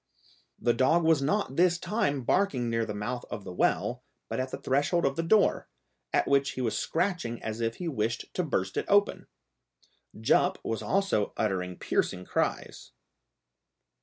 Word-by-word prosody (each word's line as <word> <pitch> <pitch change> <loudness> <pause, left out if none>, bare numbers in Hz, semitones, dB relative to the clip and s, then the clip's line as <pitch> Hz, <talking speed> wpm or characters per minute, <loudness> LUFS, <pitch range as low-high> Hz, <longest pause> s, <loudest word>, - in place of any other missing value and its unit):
The 120 0 +2
dog 135 +8 +3
was 160 -3 +4
not 150 -1 0
this 175 0 +4
time 170 - -1
barking 130 -7 +1
near 115 -1 0
the 105 - -3
mouth 120 +4 -3
of 105 - -6
the 90 - -7
well, - - 0 0.3
but - - -2
at 130 +1 -2
the - - -5
threshold 145 +5 +1
of 135 0 +1
the 165 - 0
door, 205 +5 +2 0.4
at - - +2
which 140 0 +2
he 130 - -4
was 115 -3 -1
scratching 165 -10 -1
as 110 +1 -4
if 115 0 -1
he 180 - -5
wished 115 -5 -1
to - - 0
burst 95 - -2
it - - 0
open. 205 0 +2 0.9
Jup 110 - +3
was 115 - -2
also 195 - 0
uttering 90 -4 -1
piercing 90 0 -1
cries. - - -3
130 Hz, 165 wpm, -28 LUFS, 115-170 Hz, 0.9 s, was